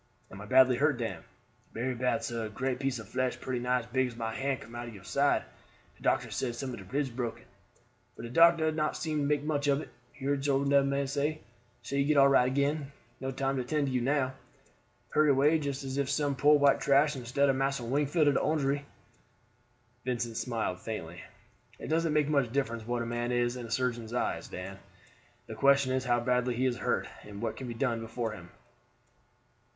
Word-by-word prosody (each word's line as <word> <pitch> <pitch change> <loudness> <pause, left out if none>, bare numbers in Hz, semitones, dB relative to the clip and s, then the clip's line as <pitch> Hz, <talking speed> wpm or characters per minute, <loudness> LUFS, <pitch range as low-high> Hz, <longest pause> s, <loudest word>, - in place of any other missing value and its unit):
"Am 95 - -9
I - - -8
badly 130 -1 +5
hurt, 150 0 +2
Dan?" 115 -8 -4 0.5
"Berry 125 +3 -2
bad, 125 +1 0
sah; 115 -2 -3
great 125 +4 -2
piece 135 -2 -1
of 110 -3 -9
flesh 130 +2 -1
pretty 130 -2 -3
nigh 125 +1 +1
as - - -12
big 130 +2 +1
as 120 - -9
my 115 -1 -3
hand 135 +1 -2
come 115 - -12
out 120 0 -5
ob 115 - -9
your 95 - -12
side, 140 +7 +2 0.5
and - - -19
doctor - - +1
says 120 -3 -2
some 130 0 -4
of - - -7
de 95 - -10
ribs 135 +6 -2
broken. 120 -1 -4 0.7
But - - -9
de 120 - -6
doctor 165 +1 +5
not 155 -1 -1
seem 155 -2 -2
to - - 0
make 145 0 +1
much 145 -2 0
ob 140 +1 +2
it; - - -10 0.2
he 135 - -9
hard 140 -1 0
sort 140 0 +1
ob 140 -1 +5
man 140 0 0
dat. - - -5
Say 150 +3 -1 0.5
you 140 0 +2
get 150 +1 +2
all 140 0 +8
right 130 -2 +5
again. 140 +2 0 0.3
No 130 - -3
time 135 +1 -1
to 130 - -1
tend 150 +3 0
to 135 - -2
you 125 - +1
now. 130 0 +1 0.8
Hurry 155 0 +3
away 145 +4 +4
just 140 -2 -3
as 135 +1 -3
if 140 - 0
you - - -2
some 145 -1 0
poor 150 +2 +5
white 140 -1 +4
trash 145 +2 +4
instead 130 +3 +1
of 135 - +3
Massa 135 -1 0
Wingfield 145 +5 +1
ob 145 - +5
de - - +2
Orangery." 145 -2 0 1.2
Vincent 120 -2 -2
smiled 110 -7 -2
faintly. 90 -6 -6 0.6
"It - - -8
doesn't 165 0 +1
make 150 -1 +3
much 140 -6 +1
difference 115 -4 -2
what 120 -1 -1
a - - -5
man 120 +1 -2
is 120 0 +1
in 120 -2 -6
a - - -13
surgeon's 120 -1 -2
eyes, - - -1
Dan; 95 +1 -7 0.7
the 110 - -8
question 140 +3 +3
is 130 0 -1
how 120 -1 +2
badly 125 0 +1
he 130 +3 0
is 125 -2 0
hurt, - - -1 0.2
and 105 -1 -9
what 110 0 -2
can 130 - -7
be 120 - -5
done 115 -2 -1
for 115 0 -3
him? 90 -5 -10
130 Hz, 220 wpm, -30 LUFS, 120-140 Hz, 1.2 s, all